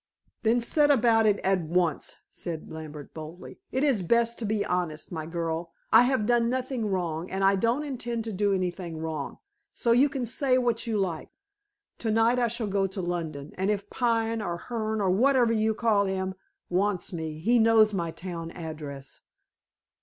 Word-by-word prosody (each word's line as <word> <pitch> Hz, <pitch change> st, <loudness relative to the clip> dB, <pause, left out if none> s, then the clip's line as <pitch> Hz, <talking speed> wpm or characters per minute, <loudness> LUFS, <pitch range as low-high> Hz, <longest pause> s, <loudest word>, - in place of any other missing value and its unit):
"Then 235 Hz, +2 st, +3 dB
set 290 Hz, +5 st, +3 dB
about 230 Hz, -5 st, +4 dB
it 205 Hz, -1 st, +3 dB
at 190 Hz, -1 st, +2 dB
once," 170 Hz, 0 st, -1 dB
said 165 Hz, -3 st, -6 dB
Lambert 155 Hz, -2 st, -8 dB
boldly. 160 Hz, +3 st, -9 dB
"It 260 Hz, -, 0 dB
is 270 Hz, -9 st, +3 dB
best 235 Hz, +5 st, +2 dB
to 230 Hz, -, -3 dB
be 210 Hz, -1 st, 0 dB
honest, 175 Hz, -4 st, -2 dB
my 160 Hz, -2 st, -4 dB
girl. 165 Hz, 0 st, -3 dB, 0.2 s
I 245 Hz, -, +8 dB
have 255 Hz, -4 st, +1 dB
done 235 Hz, 0 st, +3 dB
nothing 255 Hz, -2 st, -2 dB
wrong, 175 Hz, -3 st, -2 dB
and 195 Hz, 0 st, -2 dB
I 195 Hz, +1 st, +5 dB
don't 235 Hz, +8 st, +1 dB
intend 240 Hz, -5 st, -3 dB
to 225 Hz, -, -4 dB
do 205 Hz, +1 st, +1 dB
anything 180 Hz, -3 st, -2 dB
wrong, 155 Hz, -3 st, -4 dB, 0.4 s
so 235 Hz, -, +1 dB
you 260 Hz, +5 st, +5 dB
can 270 Hz, -3 st, -3 dB
say 255 Hz, +2 st, +1 dB
what 240 Hz, -2 st, 0 dB
you 220 Hz, -2 st, 0 dB
like. 180 Hz, -5 st, -2 dB, 0.7 s
To 225 Hz, -, -2 dB
night 225 Hz, +3 st, +3 dB
I 240 Hz, -, +3 dB
shall 235 Hz, 0 st, -2 dB
go 195 Hz, -1 st, +1 dB
to 190 Hz, +1 st, -6 dB
London, 165 Hz, -5 st, -4 dB
and 190 Hz, +2 st, +1 dB
if 205 Hz, -1 st, -2 dB
Pine, 230 Hz, -2 st, 0 dB
or 175 Hz, -4 st, -3 dB
Hearne, 220 Hz, +1 st, -3 dB
or 190 Hz, -2 st, +2 dB
whatever 245 Hz, +3 st, +4 dB
you 220 Hz, 0 st, +1 dB
call 210 Hz, -3 st, +2 dB
him, 190 Hz, 0 st, -2 dB, 0.3 s
wants 190 Hz, +1 st, 0 dB
me, 160 Hz, -2 st, -4 dB
he 230 Hz, +9 st, +3 dB
knows 220 Hz, -1 st, +5 dB
my 170 Hz, -4 st, -1 dB
town 165 Hz, 0 st, -6 dB
address." 150 Hz, -4 st, -7 dB
200 Hz, 185 wpm, -27 LUFS, 170-235 Hz, 0.7 s, I